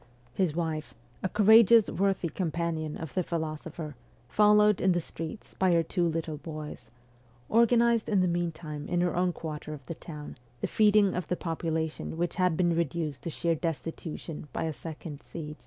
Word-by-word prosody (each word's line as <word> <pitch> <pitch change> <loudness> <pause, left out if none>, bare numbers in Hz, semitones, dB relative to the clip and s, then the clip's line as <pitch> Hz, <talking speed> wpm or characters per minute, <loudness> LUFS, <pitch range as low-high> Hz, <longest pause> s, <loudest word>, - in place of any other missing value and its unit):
His 165 0 0
wife, 160 -3 -3 0.3
a 190 - -1
courageous, 220 +1 +7
worthy 195 -3 0
companion 165 -3 -2
of 160 -4 -7
the 185 - +1
philo 160 -3 -2
sopher, 155 0 -7 0.4
followed 210 -1 +5
in 185 -1 +4
the 175 - +1
streets 165 +3 -7
by 185 -2 +4
her 165 -1 +4
two 175 +1 0
little 160 -1 -2
boys, 150 -6 -8 0.6
organized 235 0 +4
in 205 -3 +3
the 185 - +3
meantime 165 -3 -3
in 175 0 +1
her 175 0 +1
own 180 0 +2
quarter 155 -2 -6
of 140 -3 -14
the 165 - -5
town 150 -3 -9 0.2
the - - -1
feeding 210 -2 +4
of 180 - -3
the 180 - -1
population 160 -1 -3
which 175 0 0
had 180 -3 +3
been 175 -2 +2
reduced 160 -3 -2
to - - -4
sheer 170 +1 0
destitution 165 -1 -5
by - - -2
a 160 -1 -1
second 155 +1 -8
siege. 155 -2 -8
170 Hz, 175 wpm, -29 LUFS, 155-185 Hz, 0.6 s, courageous